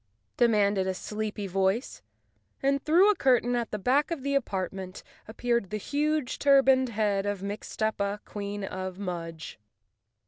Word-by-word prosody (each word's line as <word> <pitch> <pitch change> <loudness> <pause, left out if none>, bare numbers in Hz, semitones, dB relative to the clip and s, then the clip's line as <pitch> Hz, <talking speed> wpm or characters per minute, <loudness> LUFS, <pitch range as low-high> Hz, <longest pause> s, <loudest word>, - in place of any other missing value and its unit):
demanded 205 -5 +3
a 190 - -1
sleepy 210 +1 -4
voice, 195 +5 -1 0.6
and 275 0 +1
through 360 +7 +5
a - - -1
curtain 245 -5 +2
at 235 -1 -1
the 210 - -3
back 260 +8 +2
of 330 -6 -4
the 280 0 -1
apart¬ 195 -9 -1
ment 190 0 -8 0.2
appeared 235 -2 -1
the 215 - -2
huge, 295 +3 -1
turbaned 270 -2 +5
head 205 -3 0
of 200 -2 -3
Mixtuppa, 205 0 -2
Queen 205 0 -5
of 185 -1 -5
Mudge. 165 - -6
215 Hz, 145 wpm, -28 LUFS, 195-260 Hz, 0.6 s, through